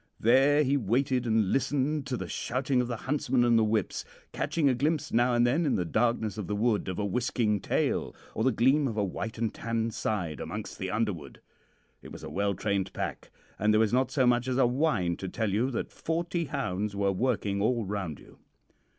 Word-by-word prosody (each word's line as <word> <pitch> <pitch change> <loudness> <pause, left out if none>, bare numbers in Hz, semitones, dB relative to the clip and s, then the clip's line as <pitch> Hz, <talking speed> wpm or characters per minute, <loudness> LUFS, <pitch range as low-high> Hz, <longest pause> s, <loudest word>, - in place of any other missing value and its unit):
There 135 +6 +5
he 140 +1 +2
waited 125 +2 0
and 110 -4 +2
listened 140 +2 0
to 125 - -2
the - - -5
shouting 130 +1 0
of 125 - -2
the 120 - -3
huntsman 130 -3 +1
and 120 -1 +4
the 110 - +5
whips, 110 -2 0 0.3
catching 160 -4 0
a 135 - +4
glimpse 150 +4 -1
now 120 +1 +3
and 120 0 +4
then 140 +8 +2
in 145 - +1
the 90 - 0
darkness 110 +3 0
of 100 - -4
the 105 - -2
wood 110 -1 +1
of 95 - -3
a 105 - -1
whisking 110 0 0
tail, - - -1 0.2
or 110 - -1
the 130 - +4
gleam 135 +5 +3
of 110 -3 -4
a 105 - +2
white 110 +4 -4
and 115 -1 -1
tan 115 0 -2
side 90 -8 -2
amongst - - -6
the 95 - -3
underwood. 100 - -3 0.6
It - - -12
was - - -10
a - - -7
well 100 0 0
trained 100 -2 -1
pack, - - -4 0.3
and 105 +2 +3
there 105 - +4
was 110 0 +2
not 130 0 +2
so 130 -3 +2
much 120 0 +2
as 130 -1 0
a 135 - +5
whine 120 - +1
to 95 - -5
tell 110 +1 -1
you 120 +6 +1
that 125 - -3
forty 170 +1 -2
hounds 100 -5 -3
were 100 0 +1
working 100 -2 0
all 115 +1 +1
round 95 -6 -4
you. - - -18
115 Hz, 215 wpm, -29 LUFS, 105-130 Hz, 0.6 s, There